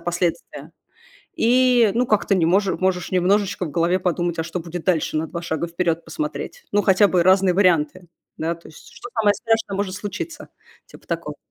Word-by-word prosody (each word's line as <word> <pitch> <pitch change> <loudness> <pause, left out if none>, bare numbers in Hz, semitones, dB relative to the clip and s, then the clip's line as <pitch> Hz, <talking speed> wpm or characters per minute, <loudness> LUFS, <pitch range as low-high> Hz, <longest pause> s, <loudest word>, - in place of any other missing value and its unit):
последствия, 175 0 -3 0.7
и, 245 -4 +4
ну, 245 +2 +2
как-то 215 -2 +2
не 180 -4 +2
може 190 +3 +2
можешь 185 -1 -1
немножечко 190 +1 +1
в - - -6
голове 170 +4 +1
подумать, 175 -1 -1
а - - 0
что 170 - -5
будет 170 0 -6
дальше, 165 -4 0
на 155 +1 -1
2 170 - -5
шага 170 0 -3
вперед 170 -1 -1
посмотреть. 315 +10 -5
Ну, 205 0 +3
хотя 195 +1 +5
бы 180 -3 +2
разные 185 0 +4
варианты, 175 -2 +2 0.3
да? 165 +2 -2
То 170 - -17
есть 155 - -15
что 245 - -10
самое 210 -2 +3
страшное 225 -2 -1
может 195 -2 -2
случиться? 265 - -6 0.4
Типа - - -16
такого. - - -4
185 Hz, 185 wpm, -22 LUFS, 170-205 Hz, 0.7 s, хотя